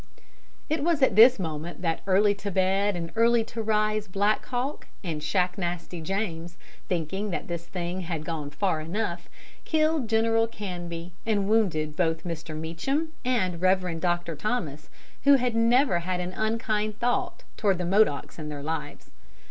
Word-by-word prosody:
] -, -, -33 dB
It 285 Hz, -, -4 dB
was 320 Hz, -4 st, +2 dB
at -, -, +4 dB
this 240 Hz, +4 st, +8 dB
moment 165 Hz, 0 st, -5 dB
that 165 Hz, -2 st, 0 dB
Early 200 Hz, +2 st, +4 dB
to 200 Hz, 0 st, -5 dB
Bed 195 Hz, +1 st, +2 dB
and 165 Hz, -1 st, -4 dB
Early 230 Hz, 0 st, +4 dB
to 225 Hz, +1 st, -5 dB
Rise 215 Hz, -1 st, +1 dB
Black 200 Hz, +3 st, +1 dB
Hawk 255 Hz, +4 st, -3 dB, 0.2 s
and 160 Hz, -5 st, -3 dB
Shacknasty 180 Hz, -1 st, -1 dB
James, 175 Hz, -2 st, -3 dB, 0.3 s
thinking 185 Hz, +4 st, -2 dB
that 180 Hz, -, -3 dB
this 170 Hz, -1 st, -5 dB
thing 180 Hz, +1 st, -3 dB
had 165 Hz, -3 st, -4 dB
gone 155 Hz, -3 st, -3 dB
far 155 Hz, +2 st, 0 dB
enough, 175 Hz, +1 st, -3 dB, 0.3 s
killed 310 Hz, -4 st, +1 dB
General 225 Hz, 0 st, +3 dB
Canby 175 Hz, -5 st, -6 dB
and 205 Hz, -3 st, +1 dB
wounded 170 Hz, -9 st, +1 dB
both 165 Hz, -2 st, 0 dB
Mr. 165 Hz, -2 st, -5 dB
Meacham 270 Hz, -, -1 dB
and 190 Hz, -9 st, 0 dB
Rev. 185 Hz, -3 st, +2 dB
Dr. 175 Hz, -1 st, -1 dB
Thomas, 155 Hz, -, -3 dB, 0.4 s
who 285 Hz, 0 st, +8 dB
had 250 Hz, -2 st, +1 dB
never 230 Hz, -3 st, +4 dB
had 180 Hz, +1 st, -2 dB
an 180 Hz, +1 st, -3 dB
unkind 215 Hz, 0 st, -1 dB
thought 245 Hz, -, -1 dB
toward 200 Hz, -4 st, +2 dB
the 180 Hz, -, -2 dB
Modocs 185 Hz, -5 st, +2 dB
in 150 Hz, -1 st, -5 dB
their 145 Hz, -1 st, -6 dB
lives. 160 Hz, +1 st, -5 dB
185 Hz, 160 wpm, -27 LUFS, 170-220 Hz, 0.4 s, this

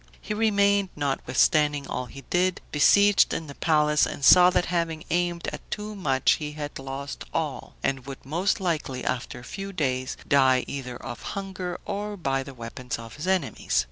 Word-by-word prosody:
He -, -, -4 dB
remained, 200 Hz, -2 st, +3 dB
notwithstanding 145 Hz, +1 st, +2 dB
all 125 Hz, -, -3 dB
he 135 Hz, -, -10 dB
did, 180 Hz, 0 st, +2 dB
besieged 200 Hz, +7 st, +5 dB
in 165 Hz, -, -4 dB
the 140 Hz, -, -9 dB
palace, 150 Hz, -1 st, +3 dB
and 140 Hz, -, -3 dB
saw 180 Hz, +3 st, +9 dB
that 180 Hz, -, +1 dB
having 165 Hz, -2 st, -1 dB
aimed 175 Hz, 0 st, 0 dB
at -, -, -7 dB
too 210 Hz, 0 st, -4 dB
much 140 Hz, -10 st, +2 dB
he 150 Hz, 0 st, -4 dB
had 145 Hz, -2 st, -6 dB
lost 135 Hz, +1 st, -6 dB
all, 155 Hz, -4 st, -3 dB
and 135 Hz, -1 st, -1 dB
would 135 Hz, -2 st, -8 dB
most 180 Hz, +10 st, 0 dB
likely, 155 Hz, -8 st, -2 dB
after 125 Hz, -1 st, -2 dB
a -, -, -13 dB
few 195 Hz, +9 st, -6 dB
days, 130 Hz, -7 st, -1 dB
die 130 Hz, -2 st, +4 dB
either 125 Hz, -3 st, -6 dB
of 120 Hz, -, -8 dB, 0.2 s
hunger, 185 Hz, -2 st, -4 dB
or 205 Hz, 0 st, -4 dB
by 135 Hz, -6 st, 0 dB
the 135 Hz, 0 st, -9 dB
weapons 125 Hz, +1 st, -6 dB
of 115 Hz, +1 st, -10 dB
his 155 Hz, +5 st, -5 dB
enemies. 185 Hz, -, +1 dB
150 Hz, 175 wpm, -26 LUFS, 135-185 Hz, 0.2 s, saw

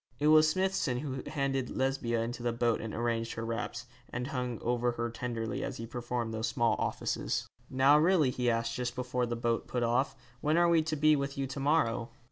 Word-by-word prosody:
It 150 Hz, +1 st, +2 dB
was 155 Hz, 0 st, +7 dB
Smithson 185 Hz, -8 st, 0 dB
who 135 Hz, -3 st, -4 dB
handed 140 Hz, -3 st, -1 dB
Lesbia 130 Hz, -3 st, 0 dB
into 120 Hz, +1 st, -5 dB
the 120 Hz, 0 st, 0 dB
boat 115 Hz, 0 st, +1 dB
and 110 Hz, -, -5 dB
arranged 115 Hz, 0 st, -1 dB
her 115 Hz, -, -4 dB
wraps, 115 Hz, +1 st, -4 dB, 0.2 s
and 125 Hz, +1 st, -3 dB
hung 125 Hz, -4 st, -3 dB
over 120 Hz, 0 st, +1 dB
her 115 Hz, 0 st, -3 dB
tenderly 115 Hz, -1 st, -3 dB
as -, -, -4 dB
he 115 Hz, -, -5 dB
performed 120 Hz, -1 st, -3 dB
those 110 Hz, 0 st, -1 dB
small 115 Hz, -1 st, +2 dB
offices. -, -, -1 dB, 0.2 s
'Now 135 Hz, +3 st, +5 dB
really,' 160 Hz, -5 st, +4 dB
he 125 Hz, -1 st, 0 dB
asked, 115 Hz, 0 st, 0 dB
just 120 Hz, 0 st, -3 dB
before 125 Hz, -1 st, -1 dB
the 120 Hz, -, -2 dB
boat 115 Hz, 0 st, -1 dB
put 125 Hz, -1 st, -1 dB
off, 120 Hz, +4 st, +1 dB, 0.2 s
'when 155 Hz, +4 st, +1 dB
are 175 Hz, 0 st, +5 dB
we 165 Hz, -1 st, +5 dB
to 155 Hz, 0 st, -2 dB
be 155 Hz, +1 st, +5 dB
with 140 Hz, -1 st, -3 dB
you 135 Hz, -, 0 dB
to 135 Hz, +2 st, -6 dB
morrow?' 135 Hz, -5 st, +1 dB
125 Hz, 210 wpm, -31 LUFS, 115-140 Hz, 0.2 s, was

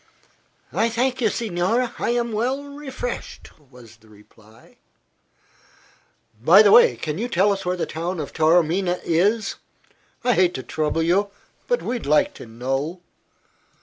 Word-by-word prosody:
"I 230 Hz, -, +1 dB
thank 255 Hz, +3 st, -1 dB
you, 220 Hz, -, +3 dB
signore, 225 Hz, +4 st, -1 dB
I -, -, -1 dB
am 235 Hz, -1 st, 0 dB
well 250 Hz, +6 st, -1 dB
refreshed," 280 Hz, -3 st, -7 dB
was 125 Hz, -5 st, -17 dB
the 110 Hz, 0 st, -23 dB
reply. 105 Hz, +1 st, -21 dB, 1.6 s
"By 180 Hz, -, +7 dB
the 205 Hz, -, +5 dB
way, 135 Hz, -, +7 dB
can 150 Hz, +8 st, -5 dB
you 235 Hz, -, -2 dB
tell 200 Hz, 0 st, +2 dB
us 195 Hz, -2 st, -6 dB
where 180 Hz, 0 st, -1 dB
the -, -, -1 dB
town 170 Hz, +2 st, -4 dB
of 150 Hz, -, -6 dB
Taormina 175 Hz, +3 st, +2 dB
is? 195 Hz, +6 st, +1 dB, 0.7 s
I 245 Hz, 0 st, +3 dB
hate 180 Hz, -3 st, +2 dB
to 130 Hz, -, -5 dB
trouble 155 Hz, +1 st, -1 dB
you; 195 Hz, +5 st, +1 dB, 0.4 s
but -, -, 0 dB
we'd 240 Hz, -, -4 dB
like 150 Hz, +1 st, +3 dB
to -, -, -11 dB
know." 135 Hz, +9 st, -4 dB
180 Hz, 150 wpm, -22 LUFS, 150-230 Hz, 1.6 s, By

